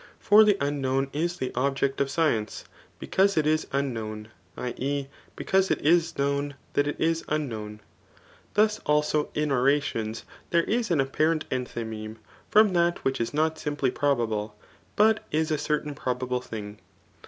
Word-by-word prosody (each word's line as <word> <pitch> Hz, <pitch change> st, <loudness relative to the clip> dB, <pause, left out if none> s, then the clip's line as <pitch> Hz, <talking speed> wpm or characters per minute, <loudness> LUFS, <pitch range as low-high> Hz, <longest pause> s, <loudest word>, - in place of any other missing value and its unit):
For 210 Hz, +1 st, +7 dB
the 205 Hz, -2 st, +4 dB
unknown 135 Hz, -1 st, -1 dB
is 170 Hz, +4 st, -1 dB
the 130 Hz, -, -3 dB
object 135 Hz, +1 st, 0 dB
of 140 Hz, -, +1 dB
science, 140 Hz, -9 st, 0 dB, 0.3 s
because 195 Hz, 0 st, +1 dB
it 155 Hz, -, +3 dB
is 155 Hz, +1 st, +1 dB
unknown, 110 Hz, -6 st, -3 dB, 0.3 s
[i. 125 Hz, -1 st, -3 dB
e. 140 Hz, +1 st, -2 dB, 0.3 s
because 190 Hz, 0 st, +1 dB
it -, -, +1 dB
is 165 Hz, +2 st, +2 dB
known 140 Hz, 0 st, -1 dB, 0.2 s
that 145 Hz, -, +2 dB
it 145 Hz, -, -3 dB
is 165 Hz, 0 st, +1 dB
unknown.^ 110 Hz, -8 st, -3 dB, 0.7 s
Thus 215 Hz, +1 st, +3 dB
also 150 Hz, 0 st, +1 dB
in 150 Hz, -1 st, 0 dB
orations 125 Hz, -4 st, 0 dB, 0.2 s
there 170 Hz, 0 st, +3 dB
is 230 Hz, +2 st, -1 dB
an 170 Hz, -4 st, +2 dB
apparent 155 Hz, +4 st, 0 dB
enthymeme^ 110 Hz, -3 st, -4 dB, 0.3 s
fo»n 210 Hz, -2 st, +5 dB
that 170 Hz, 0 st, +1 dB
which 135 Hz, -2 st, 0 dB
is 115 Hz, -, -1 dB
not 155 Hz, +1 st, 0 dB
simply 145 Hz, -4 st, -1 dB
probable, 110 Hz, -7 st, -1 dB, 0.4 s
but 215 Hz, 0 st, +4 dB
is 155 Hz, +1 st, 0 dB
a 155 Hz, -, +1 dB
certain 150 Hz, -1 st, -1 dB
probable 125 Hz, -1 st, -2 dB
thing. 105 Hz, -3 st, -8 dB
145 Hz, 155 wpm, -26 LUFS, 125-160 Hz, 0.7 s, For